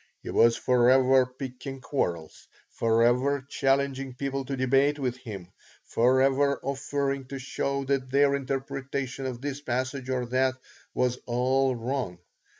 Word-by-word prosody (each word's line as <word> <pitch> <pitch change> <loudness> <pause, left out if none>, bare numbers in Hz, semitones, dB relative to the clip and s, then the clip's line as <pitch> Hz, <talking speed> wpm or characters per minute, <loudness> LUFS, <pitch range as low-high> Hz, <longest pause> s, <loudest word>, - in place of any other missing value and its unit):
He - - -5
was 115 0 +4
forever 130 +1 +4
picking 130 +1 -7
quarrels, 85 - -3 0.2
forever 120 +4 +2
challenging 135 -1 0
people 135 +1 -3
to 135 +1 -4
debate 135 +3 +3
with 125 -3 -2
him, 105 -8 -8 0.4
forever 135 +3 +3
offering 140 0 -2
to 135 +1 -7
show 140 +1 -2
that 135 -1 -1
their 140 +1 +4
interpretation 135 -1 -3
of 125 -2 -6
this 140 0 -4
passage 130 0 -3
or 125 -1 -1
that 130 +2 +1 0.4
was 125 0 +1
all 130 +2 +2
wrong. 120 -6 -3
130 Hz, 130 wpm, -27 LUFS, 125-135 Hz, 0.4 s, was